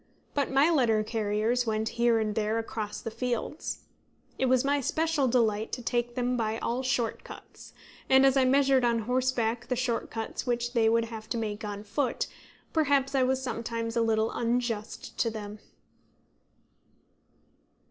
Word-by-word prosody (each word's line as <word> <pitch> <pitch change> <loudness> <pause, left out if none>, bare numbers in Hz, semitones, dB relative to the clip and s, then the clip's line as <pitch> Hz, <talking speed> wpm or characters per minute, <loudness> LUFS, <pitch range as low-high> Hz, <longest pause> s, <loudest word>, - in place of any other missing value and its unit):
But 285 -2 0
my 275 +5 +4
letter 230 -8 +3
carriers 220 +2 0
went 220 0 0
here 235 -1 +2
and 215 -1 0
there 215 +1 0
across 220 -2 -4
the 225 - -5
fields. 245 +6 -3 0.6
It 265 - +2
was 255 +1 +3
my 285 0 +2
special 315 0 +1
delight 225 -3 +1
to 245 - -4
take 240 0 -1
them 250 0 0
by 220 -2 -1
all 235 +2 -2
short 250 -3 -1
cuts; - - -12 0.4
and 265 0 +6
as 270 0 +4
I 270 - +4
measured 270 0 +4
on 235 -1 +2
horseback 245 -2 0
the 250 - 0
short 245 -1 -1
cuts 225 +2 -5
which 240 0 -1
they 225 -3 +4
would 230 0 +2
have 220 -1 -8
to 235 - -1
make 215 -2 -3
on 205 -1 -5
foot, 245 +4 -1 0.5
perhaps 285 -3 +2
I 270 - +3
was 260 +1 +1
sometimes 230 -2 -3
a 235 - +2
little 220 -1 +1
unjust 235 -2 -2
to 230 - +2
them. 210 -1 -7
235 Hz, 165 wpm, -28 LUFS, 225-260 Hz, 0.6 s, and